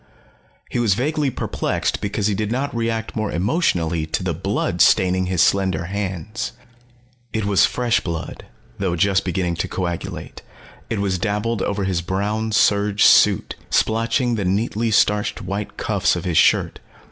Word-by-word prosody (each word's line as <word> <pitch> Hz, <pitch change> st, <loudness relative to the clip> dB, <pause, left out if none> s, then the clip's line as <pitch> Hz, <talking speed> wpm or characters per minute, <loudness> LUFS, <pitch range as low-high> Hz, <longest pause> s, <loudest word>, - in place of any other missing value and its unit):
He -, -, -1 dB
was 110 Hz, -5 st, +2 dB
vaguely 145 Hz, +4 st, 0 dB
perplexed -, -, -2 dB
because 100 Hz, 0 st, -2 dB
he 105 Hz, -, +2 dB
did 105 Hz, +2 st, -2 dB
not 135 Hz, +2 st, -2 dB
react 115 Hz, -1 st, -2 dB
more 110 Hz, -2 st, -2 dB
emotionally 85 Hz, -, 0 dB
to -, -, -2 dB
the -, -, -1 dB
blood -, -, -1 dB
staining 95 Hz, 0 st, +4 dB
his 90 Hz, -3 st, +2 dB
slender 95 Hz, -1 st, +1 dB
hands. 100 Hz, +2 st, -4 dB, 0.8 s
It 110 Hz, -2 st, -1 dB
was 100 Hz, -2 st, +4 dB
fresh 120 Hz, -2 st, +1 dB
blood, 85 Hz, -2 st, -6 dB, 0.3 s
though 95 Hz, -3 st, 0 dB
just 95 Hz, +3 st, +2 dB
beginning 90 Hz, -2 st, -2 dB
to -, -, -2 dB
coagulate; 85 Hz, -2 st, -5 dB, 0.5 s
it 115 Hz, -, -1 dB
was 95 Hz, -3 st, -1 dB
dabbled 105 Hz, +1 st, -1 dB
over 100 Hz, 0 st, -1 dB
his 95 Hz, -3 st, 0 dB
brown 105 Hz, +5 st, -2 dB
serge 105 Hz, 0 st, +3 dB
suit, -, -, +5 dB, 0.2 s
splotching 115 Hz, +2 st, +1 dB
the 100 Hz, -, -1 dB
neatly 110 Hz, +4 st, 0 dB
starched 105 Hz, +1 st, +1 dB
white 100 Hz, +3 st, -5 dB
cuffs -, -, +1 dB
of -, -, -5 dB
his 85 Hz, -4 st, +2 dB
shirt. -, -, +3 dB
100 Hz, 155 wpm, -21 LUFS, 95-110 Hz, 0.8 s, suit